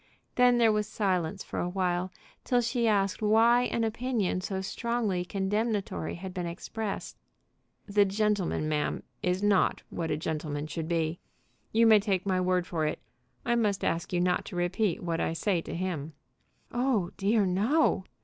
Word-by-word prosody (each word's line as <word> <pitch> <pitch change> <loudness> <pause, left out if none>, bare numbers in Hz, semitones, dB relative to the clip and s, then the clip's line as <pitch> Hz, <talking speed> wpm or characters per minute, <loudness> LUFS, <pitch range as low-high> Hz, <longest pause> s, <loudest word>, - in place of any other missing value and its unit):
Then 245 -1 +5
there 230 -2 +5
was 210 -1 0
silence 190 -3 -1
for - - -5
awhile, 180 0 -1 0.3
till 245 - +2
she 235 0 0
asked 200 -2 +1
why 230 +3 +5
an 230 - -1
opinion 225 -4 -1
so 190 0 -3
strongly 210 -1 -1
condemnatory 195 - -2
had 185 +1 -7
been 180 -2 -3
expressed. 195 +4 -5 0.7
"The 205 0 +4
gentleman, 200 -5 0
ma'am, 150 -1 -1 0.2
is 180 +2 0
not 205 -2 +2
what 165 -2 -3
a 150 - 0
gentleman 150 -2 -3
should 160 0 -4
be. 165 0 -1 0.5
You 230 +1 +4
may 220 -2 +7
take 195 -3 -1
my 185 -2 +1
word 180 -1 +1
for 160 -4 -1
it. 150 - -2 0.5
I 240 - +2
must 210 -4 +1
ask 170 - -1
you 175 - +1
not 180 0 +1
to - - -8
repeat 175 +2 0
what 165 -1 -1
I - - 0
say 175 +1 0
to - - -6
him." 165 -4 -3 0.6
"Oh 240 -8 0
dear, 205 +1 +2
no." 200 - +2
190 Hz, 165 wpm, -29 LUFS, 175-220 Hz, 0.7 s, may